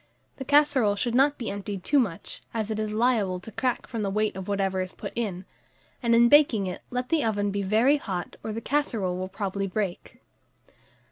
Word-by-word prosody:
The 265 - -6
casserole 285 -7 +4
should 235 +3 -1
not 280 +3 +4
be 235 - -4
emptied 200 -1 -5
too 290 - +3
much, 195 -10 -3
as 220 -1 -2
it 215 - -2
is 215 -1 -2
liable 215 -5 +1
to 200 +5 -10
crack 250 +3 -1
from 230 - -4
the 200 - -1
weight 215 +1 0
of 190 -1 -6
whatever 195 -2 0
is 185 0 -5
put - - -7
in; 195 -6 -3 0.6
and 235 -2 +3
in 235 +1 +6
baking 255 -7 +5
it, 180 - -5
let 250 0 -3
the 320 -2 +2
oven 205 -2 0
be 200 0 -1
very 225 +9 +3
hot, 185 -10 -5
or 220 - -3
the 225 +2 -4
casserole 230 -11 -1
will 185 0 -4
probably 195 0 -3
break. 190 -2 -4
215 Hz, 205 wpm, -26 LUFS, 195-245 Hz, 0.6 s, in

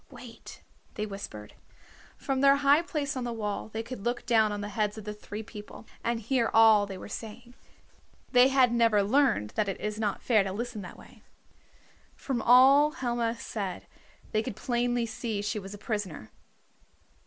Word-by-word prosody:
"Wait," - - -12 0.3
they 210 - -2
whispered. 195 - -8 0.6
From 270 -1 -2
their 275 0 +6
high 285 +2 +4
place 295 -4 -3
on 255 - -3
the 240 - -3
wall 215 -2 -4
they 225 +1 -4
could 235 -3 -8
look 240 +1 -2
down 220 -3 +3
on 205 0 -4
the 205 - -5
heads 210 0 -2
of 215 - -7
the 210 - -4
three 210 +1 -8
people, 210 -1 -11 0.2
and 235 0 -1
hear 235 0 +1
all 220 -2 +6
they 195 -1 -7
were - - -9
saying. 230 +3 -9 0.8
They 250 +1 +6
had 260 -3 +3
never 230 -3 +3
learned 235 - +2
that 210 -2 -1
it 195 - -4
is 210 0 -4
not 210 -2 -2
fair 220 -5 +3
to 195 - -4
listen 235 0 -5
that 180 - -10
way. - - -17 0.9
From 255 -4 -3
all 270 +5 +6
Helma 240 -4 -2
said 200 -5 -5 0.5
they 215 - +1
could 225 -2 -6
plainly 240 +1 0
see 225 -1 -4
she 210 +1 -2
was 195 +1 -9
a - - -10
prisoner. 200 - -5
225 Hz, 180 wpm, -28 LUFS, 210-245 Hz, 0.9 s, their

